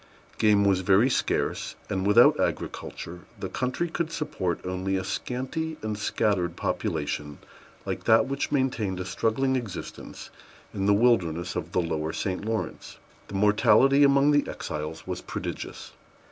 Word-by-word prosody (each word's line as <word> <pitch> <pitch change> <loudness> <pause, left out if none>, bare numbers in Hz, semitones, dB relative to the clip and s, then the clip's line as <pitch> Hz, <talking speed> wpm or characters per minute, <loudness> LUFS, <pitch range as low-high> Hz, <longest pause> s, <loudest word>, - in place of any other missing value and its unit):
Game 105 -2 +4
was 95 -2 +3
very 100 +7 +4
scarce; - - -1
and, 95 -1 -1
without 105 - +6
agriculture, 90 +1 -3 0.2
the - - -4
country 130 +7 -1
could 165 -1 -3
support 95 - -2
only 95 +1 -2
a 95 - -2
scanty 155 +9 -3
and 110 -1 -2
scattered 100 -4 0
population 75 -1 -2 0.5
like - - -4
that 115 +3 +5
which 135 +1 -3
maintained 115 -9 0
a 95 - -3
struggling 130 +7 0
existence 110 -8 -6 0.4
in 100 0 -1
the 105 - +6
wilderness 90 -7 +2
of 85 -1 -4
the 90 - +2
lower 80 -1 -2
St. 95 -1 -2
Lawrence. 110 +1 -4 0.3
The - - -7
mortality 105 +7 +5
among 140 +1 +5
the 145 0 +2
exiles 75 +1 -5
was - - -4
prodigious. - - -6
105 Hz, 145 wpm, -26 LUFS, 90-130 Hz, 0.5 s, without